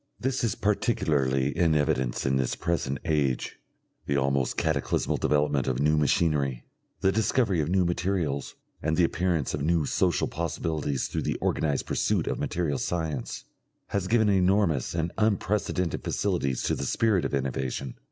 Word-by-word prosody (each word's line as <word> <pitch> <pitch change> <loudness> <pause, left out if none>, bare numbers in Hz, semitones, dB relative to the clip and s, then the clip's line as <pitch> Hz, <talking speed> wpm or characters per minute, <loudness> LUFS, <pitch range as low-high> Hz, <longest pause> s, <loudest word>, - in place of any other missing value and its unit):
This 130 0 -1
is 115 - +1
particularly 75 - +1
in 85 -3 +3
evidence 75 -5 0
in 65 0 +2
this 65 -2 0
present 70 -5 -1
age. 70 -5 0 0.5
The 70 - +1
almost 70 -1 0
cataclysmal 80 -3 0
development 75 -2 +1
of 65 -1 0
new 75 +2 +3
machinery, 75 -3 +1 0.4
the 95 - +3
discovery 110 -4 +1
of 75 - -2
new 95 0 +3
materials, 85 -5 -1 0.3
and 80 +1 0
the 90 - +4
appearance 85 -3 0
of 75 - -2
new 80 0 +2
social - - +1
possibilities 80 -3 -2
through - - -3
the - - -1
organised 75 -3 0
pursuit - - 0
of - - -2
material 80 -6 -1
science, 80 -7 -3 0.5
has 100 -2 -1
given 110 +1 +3
enormous 95 -7 +2
and 85 +1 -1
unprecedented 100 -4 0
facilities 75 -10 -1
to - - +1
the 70 - -2
spirit 105 - +2
of - - -1
innovation. 65 -1 -3
80 Hz, 150 wpm, -27 LUFS, 70-90 Hz, 0.5 s, the